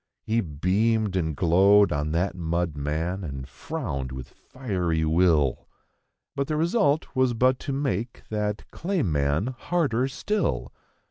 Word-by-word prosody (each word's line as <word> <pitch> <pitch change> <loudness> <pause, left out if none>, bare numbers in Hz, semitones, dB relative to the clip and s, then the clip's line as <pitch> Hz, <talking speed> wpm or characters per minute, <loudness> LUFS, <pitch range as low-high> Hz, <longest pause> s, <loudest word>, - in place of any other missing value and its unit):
He 115 +1 +1
beamed 100 +6 0
and 80 -5 0
glowed 95 +7 +5
on 75 +1 -1
that 90 +4 0
mud 85 -2 -1
man 80 +6 -2
and 70 -5 -6
frowned 75 - -5
with 65 -1 -7
fiery 90 -11 -2
will. 80 -5 +2 0.7
But 140 -1 -1
the 155 - -1
result 160 -4 +1
was 130 -2 +2
but 130 +2 +3
to 140 - -4
make 120 -5 -2
that 105 -1 -2
clay 180 -2 -1
man 75 - 0
harder 135 -5 0
still. 205 +10 -2
100 Hz, 135 wpm, -26 LUFS, 80-130 Hz, 0.7 s, glowed